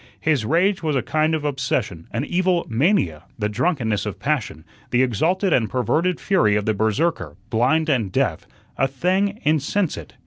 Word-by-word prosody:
His 150 -8 +1
rage 180 - +2
was 155 -3 -1
a 130 - 0
kind 155 +2 +1
of 150 -1 -4
obsession, 125 - -2
an 120 +5 -3
evil 180 0 +1
mania, 115 - +1
the 105 -3 -1
drunkenness 110 - -1
of 100 -2 -5
passion, 115 - -2 0.2
the 125 +1 +3
exalted 170 - +1
and 115 -4 +2
perverted 160 - 0
fury 110 - +2
of 105 -1 0
the 110 - +1
Berserker, 110 +11 -1 0.2
blind 130 +8 +2
and 120 -10 0
deaf, 120 - -1 0.3
a 135 - +3
thing 190 - 0
insensate. 150 - -1
135 Hz, 165 wpm, -22 LUFS, 110-170 Hz, 0.3 s, the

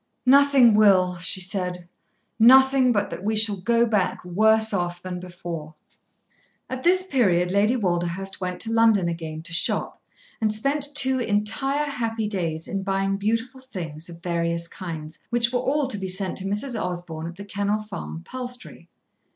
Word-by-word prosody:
"Nothing 275 -3 +6
will," 190 -4 +4
she 180 +2 -1
said; 180 -2 -2 0.5
"nothing 265 +2 +6
but 205 -3 0
that - - -6
we 220 +2 0
shall 210 -1 +2
go 235 +5 +2
back 205 -6 -1
worse 220 +4 +3
off 175 -2 -2
than 180 0 -6
before." 175 -3 -7 1.0
At 260 0 -4
this 365 +3 +4
period 190 - +2
Lady 205 +5 +3
Walderhurst 185 -2 -2
went 180 -1 -3
to 225 - -4
London 225 -5 +4
again 160 -2 -5
to 170 0 -6
shop, 165 - -1 0.4
and 215 -1 +2
spent 280 +6 -2
two 260 -2 +2
entire 240 +7 0
happy 230 -6 -2
days 165 -6 -3
in 195 - -3
buying 195 0 -1
beautiful 230 +5 -2
things 170 - -7
of 170 0 -12
various 170 -1 -1
kinds, 160 -4 -8
which 235 +1 0
were 245 - +2
all 275 +2 0
to 210 - -2
be 190 - -4
sent 185 0 -2
to 190 - -5
Mrs. 210 +7 -2
Osborn 175 -3 -5
at 170 - -8
The 200 +2 -9
Kennel 205 +1 -1
Farm, 200 -5 -7
Palstrey. 250 -1 -7
200 Hz, 165 wpm, -24 LUFS, 180-235 Hz, 1.0 s, Nothing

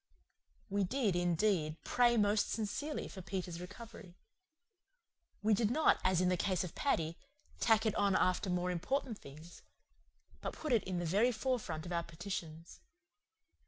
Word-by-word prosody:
We 200 0 0
did, 215 -1 0
indeed, 175 -2 +1
pray 240 -1 +3
most 205 0 +3
sincerely 230 +8 -3
for 190 - -9
Peter's 180 -2 -4
recovery. 195 -1 -10 1.3
We 215 +1 +4
did 210 +1 +2
not, 310 +7 +4
as 185 -1 +3
in 180 - +3
the 180 - +2
case 185 0 0
of 180 - -6
Paddy, 165 - 0 0.4
"tack 225 -1 +4
it 220 - +2
on 200 -2 +2
after 185 +2 +2
more 180 0 0
important 225 +6 -2
things," 155 +5 -12 0.8
but - - -4
put 305 -5 -2
it 225 - +3
in 185 -1 -2
the 175 - -1
very 205 +9 +3
forefront 215 -9 -2
of 175 - -6
our 170 -1 +1
petitions. 170 -1 -7
190 Hz, 155 wpm, -35 LUFS, 175-220 Hz, 1.3 s, We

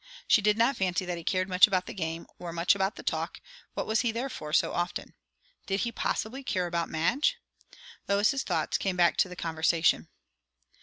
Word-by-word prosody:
She 225 - +5
did 210 +1 +3
not 235 +4 +3
fancy 185 0 0
that 175 -1 -3
he - - -10
cared 185 +2 0
much 185 +1 +6
about 185 -3 0
the - - -7
game, 165 -2 -4
or 175 -1 -6
much 170 +1 +3
about 195 0 -1
the - - -9
talk; - - -2 0.4
what - - -2
was 220 0 +1
he 240 -2 +1
there 240 +4 -3
for, 150 - -7
so 160 - +2
often? 175 +1 -3 0.5
Did 195 -1 0
he, 235 - -1
possibly, 235 +3 -2
care 185 -8 -1
about 170 -1 -2
Madge? 235 - +1 0.7
Lois's 205 +7 +2
thoughts - - -1
came 190 -2 -1
back 175 -1 +4
to 185 - +3
the 180 - -8
conversation. 165 0 +1
185 Hz, 200 wpm, -28 LUFS, 170-220 Hz, 0.7 s, much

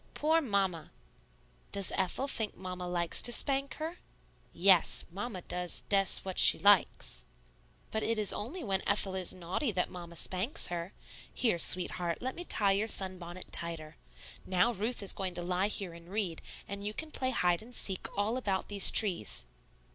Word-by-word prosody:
Poor 320 +2 +2
Mamma!" 195 - -1 0.8
"Does 200 -1 -1
Ethel 190 +8 0
think 220 -6 -2
Mamma 180 -1 -6
likes 175 -1 +1
to 240 - +6
spank 275 +3 0
her?" 325 +3 -6 0.5
"Yes; 185 -1 +4
Mamma 195 -1 -6
does 180 -1 -4
des 195 -1 +3 0.2
what 190 -1 -2
she - - +8
likes." 200 -2 +2 0.7
"But 220 - -2
it 230 0 -1
is 210 -2 +4
only 295 - -5
when 195 -4 -1
Ethel 200 -1 +1
is 185 -2 -2
naughty 185 - -3
that 180 - -1
Mamma 175 -2 -9
spanks 190 - +1
her. 175 +1 -5 0.4
Here, 220 -9 0
sweetheart, 175 -1 +2
let 260 +1 -4
me 350 - -7
tie 205 - +2
your 200 +3 0
sunbonnet 185 -3 -3
tighter. 165 -2 -5 0.5
Now 190 +6 +1
Ruth 215 +2 -3
is 195 - +1
going 185 -2 -4
to 175 - -4
lie 180 +2 0
here 195 -4 -4
and 170 +1 -14
read, 190 -5 -3 0.3
and 200 0 -6
you 210 +1 -5
can 315 -1 -6
play 255 -3 -1
hide 175 -8 +1
and 240 +2 -10
seek 190 -2 0
all 215 +4 0
about 195 -7 -2
these 200 -1 +5
trees." 180 - +3
195 Hz, 170 wpm, -31 LUFS, 180-220 Hz, 0.8 s, she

